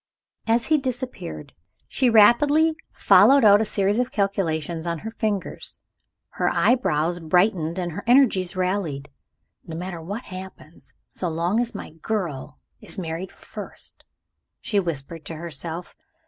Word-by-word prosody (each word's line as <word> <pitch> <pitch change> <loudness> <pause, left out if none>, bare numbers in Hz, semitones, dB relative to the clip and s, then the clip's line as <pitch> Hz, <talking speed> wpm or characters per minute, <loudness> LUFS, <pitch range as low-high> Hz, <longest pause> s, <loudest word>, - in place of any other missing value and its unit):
As 230 +1 +2
he 310 -1 +3
disappeared, 250 - -5 0.3
she 255 -2 +1
rapidly 290 +9 +5 0.2
followed 275 -3 +6
out 205 0 +7
a - - +1
series 205 +1 +1
of 250 0 -1
calculations 170 -5 -1
on 170 0 -1
her 225 - -4
fingers. 210 -4 -3 0.5
Her - - 0
eyes 175 - +1
brightened, 170 0 +1
her 175 -3 -4
energies 220 -8 +4
rallied. 180 -7 -2 0.5
"No 160 -1 -7
matter 175 -1 -5
what 200 +9 -6
happens 185 -5 -11
so 180 - -3
long 170 +7 0
as 240 0 -2
my - - -7
girl 160 -5 -4 0.2
is - - -6
married 170 +1 -4
first," - - -9 0.6
she 220 -6 0
whispered 165 -2 -4
to 165 - -6
herself. 165 +1 -5
185 Hz, 135 wpm, -23 LUFS, 165-225 Hz, 0.6 s, out